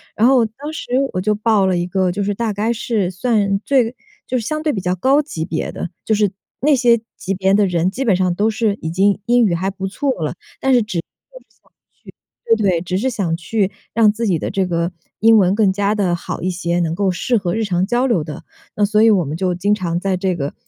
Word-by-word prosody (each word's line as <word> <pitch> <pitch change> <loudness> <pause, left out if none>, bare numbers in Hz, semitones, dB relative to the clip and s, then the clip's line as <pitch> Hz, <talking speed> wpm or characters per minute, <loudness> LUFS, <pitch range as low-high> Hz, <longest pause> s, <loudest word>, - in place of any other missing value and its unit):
然 225 +3 +4
后 255 -4 +4
当 280 +8 -8
时 265 - -7 0.2
我 185 - -1
就 210 +2 +1
报 210 -2 +2
了 185 -2 +1
一 175 +1 -1
个， 185 -1 0
就 200 +2 -2
是 205 +1 -1
大 230 -1 -1
概 215 +4 -1
是 215 -5 -1
算 200 0 0
最 250 -3 +1 0.3
就 255 - -1
是 225 - -3
相 310 +2 -2
对 310 -2 0
比 195 - -3
较 180 0 -1
高 270 - +3
级 165 - -5
别 165 -3 -3
的， 175 - -5 0.2
就 220 - +1
是 205 -2 +1 0.3
那 295 0 +4
些 235 -2 +4 0.2
级 195 - -3
别 190 +1 +1
的 205 0 +4
人 175 0 +1
基 260 +6 -4
本 200 -5 +3
上 180 -1 +1
都 210 +3 +2
是 215 -2 0
已 160 - -3
经 195 +3 +2
英 240 -1 +4
语 180 - +1
还 185 +3 -1
不 190 0 -5
错 275 +8 -2
了， 155 - -3 0.2
但 265 -1 +2
是 245 - +5
只 210 -4 -4
是 - - 0
想 - - -21 0.8
去 220 - -2
对， 195 - +3
对， 170 -2 +1
只 180 +1 -2
是 260 +6 0
想 185 -8 -1
去 200 +3 -1 0.2
让 220 -2 +5
自 225 +2 -3
己 175 -6 +1
的 - - -3
这 190 -1 0
个 170 0 -1 0.3
英 225 0 +6
文 185 -2 +4
更 210 -3 +3
加 205 +1 +1
地 190 -5 +1
好 - - -6
一 185 - -1
些， 175 -1 -1
能 165 -1 -1
够 195 -1 +1
适 235 +7 0
合 180 -4 -2
日 225 - 0
常 185 -2 0
交 245 +4 +1
流 180 -11 +1
的。 160 +2 -8 0.3
那 205 - +2
所 210 +1 +2
以 225 - +6
我 180 -6 +2
们 150 +3 -4
就 185 -1 0
经 200 +4 +1
常 175 -3 -2
在 190 -1 -1
这 185 -1 -1
个 140 -3 -4
200 Hz, 275 characters per minute, -19 LUFS, 180-225 Hz, 0.8 s, 英